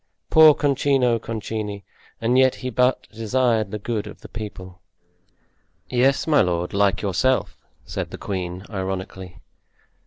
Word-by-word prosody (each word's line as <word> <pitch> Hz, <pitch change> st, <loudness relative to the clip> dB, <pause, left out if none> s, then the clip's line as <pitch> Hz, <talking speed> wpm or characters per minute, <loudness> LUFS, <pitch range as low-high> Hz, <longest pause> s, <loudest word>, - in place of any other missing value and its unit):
Poor 155 Hz, -2 st, +8 dB
Concino 135 Hz, -4 st, +2 dB
Concini! 110 Hz, -3 st, -5 dB, 0.4 s
And 115 Hz, +2 st, +1 dB
yet 130 Hz, 0 st, +4 dB
he 130 Hz, -1 st, -5 dB
but 125 Hz, +2 st, +1 dB
desired 115 Hz, -1 st, 0 dB
the 105 Hz, -, -4 dB
good 105 Hz, 0 st, -3 dB
of -, -, -11 dB
the -, -, -10 dB
people." 95 Hz, -4 st, -8 dB, 1.1 s
"Yes, 130 Hz, +2 st, +2 dB
my 155 Hz, -2 st, +4 dB
lord, 90 Hz, -1 st, -1 dB
like 100 Hz, 0 st, +2 dB
yourself!" 125 Hz, +7 st, +1 dB, 0.3 s
said -, -, -4 dB
the -, -, -8 dB
queen, 90 Hz, -1 st, -5 dB
ironically. 95 Hz, -2 st, -5 dB
110 Hz, 130 wpm, -23 LUFS, 95-130 Hz, 1.1 s, Poor